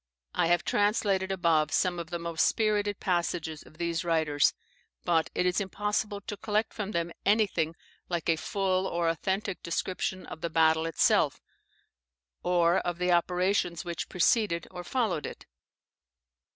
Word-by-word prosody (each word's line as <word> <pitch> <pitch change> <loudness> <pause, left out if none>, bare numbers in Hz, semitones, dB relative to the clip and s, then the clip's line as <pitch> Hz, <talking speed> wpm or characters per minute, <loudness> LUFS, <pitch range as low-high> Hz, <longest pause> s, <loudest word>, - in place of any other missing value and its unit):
I - - +2
have 175 0 +3
translated 205 -2 +1
above 165 -5 +2
some 180 -1 +1
of 170 -1 -6
the 175 - -2
most 170 -1 -1
spirited 210 -2 +1
passages 170 -3 -1
of 155 - -17
these 170 0 -1
writers; 160 -4 +2 0.5
but 165 -2 +2
it 180 - +1
is 180 +3 +2
impossible 205 +1 -2
to 205 +1 -6
collect 215 +1 -1
from 210 -2 -4
them 170 -4 -2
anything 195 -6 +2 0.3
like 170 -2 -2
a 165 - +4
full 190 +2 0
or 170 -2 -1
authentic 190 +4 -2
description 185 +2 -2
of 160 - -9
the 170 - -2
great 160 - -23
battle 160 0 +4
itself, 165 - +2 1.0
or 175 0 +3
of 175 -1 -3
the 180 0 +1
operations 180 0 +1
which 170 -1 -4
preceded 180 0 +2
or 180 -1 -7
followed 200 - -1
it. - - -10
175 Hz, 150 wpm, -29 LUFS, 170-195 Hz, 1.0 s, a